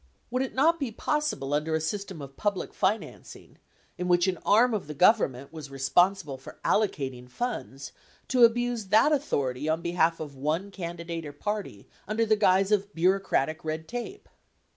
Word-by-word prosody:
Would 255 +1 0
it 265 - -3
not 325 +5 +3
be 270 -5 -2
possible 220 - -1
under 155 +2 0
a - - +1
system 185 0 -4
of 135 0 -11
public 205 -3 -2
financing, 205 +3 -3 0.4
in 180 - -2
which 175 0 +4
an 180 -3 -1
arm 230 +4 +4
of 205 -8 -2
the 150 - -6
Government 140 - +3
was 155 -3 -8
responsible 140 +2 +1
for 135 - -12
allocating 135 - 0
funds, 135 - -5 0.4
to 250 -2 +4
abuse 240 -1 +3
that 220 +9 +5
au 295 - +4
thority 140 - -1
on 160 +1 -2
behalf 170 -1 +1
of 145 -3 -7
one 155 +9 -2
candidate 170 -2 -5
or 145 - -8
party 205 - -5 0.2
under 220 +2 +1
the 215 0 +3
guise 195 -1 +3
of 205 -1 +1
bureau 185 +4 +3
cratic 155 -4 -1
red 160 0 -4
tape? 245 - -6
180 Hz, 175 wpm, -27 LUFS, 150-215 Hz, 0.4 s, that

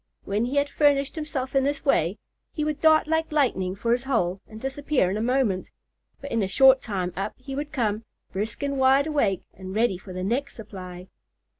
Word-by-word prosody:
When 210 +4 0
he 255 +4 -3
had 285 0 +3
furnished 280 -1 +2
himself 295 -4 -4
in 270 - +4
this 285 +1 -2
way, 190 - +2 0.3
he 305 - -3
would 305 -1 -2
dart 315 -1 +5
like 320 +1 0
lightning 195 -11 +1
for 230 +4 -1
his 245 +2 +1
hole, 195 -8 0
and 220 - -10
disappear 270 -5 0
in - - -1
a 215 - -2
moment; 235 -6 0 0.5
but 280 - -8
in 230 - +1
a 195 - 0
short 265 +6 +6
time 185 -5 -3
up 195 +3 -3
he 270 +1 -8
would 290 +1 -4
come, 220 -4 -1 0.3
brisk 215 +7 -3
and 280 -1 -1
wide 265 +2 +5
awake, 280 - 0
and 190 +1 -8
ready 220 -5 +1
for 190 - -11
the 185 0 -4
next 255 +8 -1
supply. 185 -4 -9
250 Hz, 205 wpm, -25 LUFS, 195-280 Hz, 0.5 s, short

